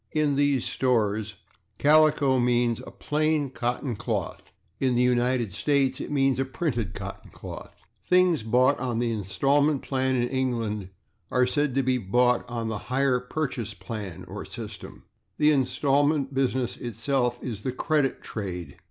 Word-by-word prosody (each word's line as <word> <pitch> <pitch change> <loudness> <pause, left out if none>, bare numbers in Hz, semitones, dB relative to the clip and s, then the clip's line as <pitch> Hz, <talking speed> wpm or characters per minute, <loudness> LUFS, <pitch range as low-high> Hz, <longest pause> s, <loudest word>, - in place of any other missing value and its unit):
In 150 -2 +2
these 140 -3 +2
stores 110 -4 0 0.4
/calico/ 145 -4 +4
means 120 -1 +1
a - - -6
plain 155 -2 0
cotton 125 0 -2
cloth; 105 -3 -4 0.3
in 130 -2 +1
the 120 - +3
United 125 -4 +1
States 135 +3 +1
it - - -5
means 135 -3 +2
a 135 - +1
printed 120 - -2
cotton - - -7
cloth. - - -10 0.2
Things 180 -3 +3
bought 125 +5 +3
on 125 -2 -2
the 120 0 0
instalment 135 +8 +1
plan 130 -1 0
in 120 -1 +1
England 115 -7 -2 0.4
are 125 0 +3
said 145 0 0
to 135 - +2
be 130 0 +1
bought 125 +5 +2
on 115 -2 -3
the 110 -2 -3
/hire 130 -1 +1
purchase/ 125 -8 -3
plan 95 -1 -7
or - - -6
system; - - -9 0.3
the 150 0 +5
instalment 140 +1 +1
business 130 -2 0
itself 120 +2 -1
is 110 -5 -5
the 130 - -2
/credit 145 +1 0
trade 90 -8 -6
125 Hz, 150 wpm, -26 LUFS, 115-140 Hz, 0.4 s, the